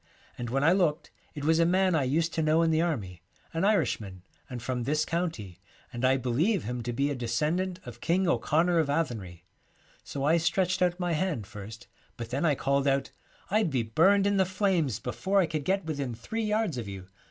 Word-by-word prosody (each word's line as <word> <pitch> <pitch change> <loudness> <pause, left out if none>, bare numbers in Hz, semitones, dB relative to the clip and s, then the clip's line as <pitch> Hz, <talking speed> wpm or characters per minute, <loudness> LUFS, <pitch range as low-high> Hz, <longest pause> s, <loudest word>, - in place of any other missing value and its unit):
And 120 -1 -5
when 135 +3 0
I 160 - +5
looked 175 -5 +1 0.2
it 145 - -6
^ - - -3
was 160 +1 +3
a - - +5
man 185 +1 +3
I 150 -5 +2
used 160 +6 0
to 160 - 0
know 155 +2 +3
in 165 - +2
the 160 0 +2
army; 100 - -3 0.3
an 165 +2 -1
Irishman, 110 - 0 0.3
and 125 -2 -5
from 125 +1 -3
this 150 +5 0
county, 155 - -3 0.3
and 120 +1 -5
I 130 +1 +4
believe 150 - +1
him 125 +2 -4
to 120 +1 -3
be 140 +4 0
a - - -2
descendant 155 +10 -1
of^King 165 +9 -1
O'Connor 170 +1 +2
of 155 -3 +1
Athenry. 105 - -3 0.3
' - - -33
So 140 - -5
I 160 +4 +4
stretched 180 +3 +1
out 180 0 +2
my 175 -1 -1
hand 155 - -1
first, 105 +3 -10 0.3
but 115 -1 -7
then 140 +6 0
I 150 -3 +3
called 140 +1 0
out, 135 0 +1 0.4
"I'd 215 -3 +2
be 130 -5 0
burned 190 - +3
in 200 0 +2
the 190 - +5
flames 185 - 0
before 195 +1 0
I 185 - +4
could 155 -3 -4
get 195 -1 0
within 140 -6 -3
three 220 - -4
yards 210 - 0
of 115 - -5
you." 95 -2 -7
155 Hz, 215 wpm, -28 LUFS, 125-175 Hz, 0.4 s, I